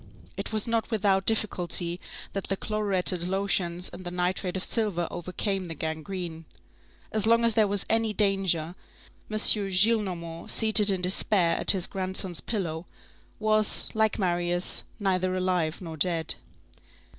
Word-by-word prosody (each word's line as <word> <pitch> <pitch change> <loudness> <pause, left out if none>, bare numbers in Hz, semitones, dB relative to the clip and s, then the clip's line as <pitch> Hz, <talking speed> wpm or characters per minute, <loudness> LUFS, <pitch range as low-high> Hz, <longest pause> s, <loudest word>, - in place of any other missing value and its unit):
It - - -5
was 215 0 0
not 230 -1 -1
without 195 -4 +1
difficulty 180 -5 +2 0.3
that 195 - -3
the 195 - -2
chloruretted 195 -5 +1
lotions 185 -2 -1
and 185 - -10
the 175 - -5
nitrate 180 +1 -2
of 185 - -3
silver 200 -7 0
overcame 185 +2 -3
the 165 - -6
gangrene. 160 +2 -5 0.7
As 215 -1 +1
long 230 +1 +4
as 230 - +3
there 215 -1 +3
was 200 -1 -1
any 225 -1 +2
danger, 195 -5 0 0.6
M. 215 - -2
Gillenormand, 195 -5 +2
seated 215 -1 +5
in 190 -2 0
despair 180 -2 +2
at - - -1
his 185 -3 +6
grandson's 185 -2 -4
pillow, 175 -6 -4 0.5
was, 215 0 +2
like 220 -1 +1
Marius, 175 -1 0 0.2
neither 185 -2 0
alive 180 -3 -1
nor 165 -3 -7
dead. 165 0 +1
190 Hz, 140 wpm, -27 LUFS, 175-210 Hz, 0.7 s, his